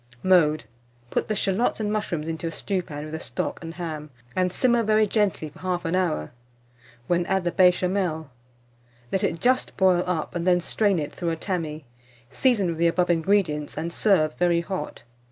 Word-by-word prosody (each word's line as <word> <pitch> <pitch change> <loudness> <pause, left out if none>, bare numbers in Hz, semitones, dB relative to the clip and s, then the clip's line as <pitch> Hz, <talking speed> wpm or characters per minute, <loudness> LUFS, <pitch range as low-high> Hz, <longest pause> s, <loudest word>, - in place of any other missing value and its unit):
Mode. 165 -5 +4 0.5
Put - - 0
the 215 - -1
shalots 200 +5 0
and 210 -1 -1
mushrooms 170 -7 -2
into 165 +1 -3
a - - -3
stewpan 165 -4 -3
with 155 0 -8
the 160 - -3
stock - - -4
and 165 0 -7
ham, 155 -4 -5 0.3
and 185 -1 +1
simmer 240 +4 +3
very 215 0 +3
gently 200 -7 0
for - - -17
1/2 180 -2 -1
hour, 75 - 0 0.7
when 175 +5 +1
add 190 -1 +1
the 175 - 0
Béchamel. 180 -3 +2 0.8
Let 190 - 0
it 165 - 0
just 255 +1 +1
boil 185 -2 +4
up, 165 -4 -2
and 175 0 -2
then 180 -1 +5
strain 200 +2 +1
it 150 -3 -3
through 170 - -3
a 165 - -1
tammy; 160 -4 -4 0.5
season 240 -7 +2
with 165 -1 -4
the 170 - +4
above 175 +1 +2
ingredients, 165 -4 +1
and 165 +2 -3
serve 165 -8 +3
very 175 -1 +3
hot. 185 +2 -5
175 Hz, 180 wpm, -25 LUFS, 160-195 Hz, 0.8 s, then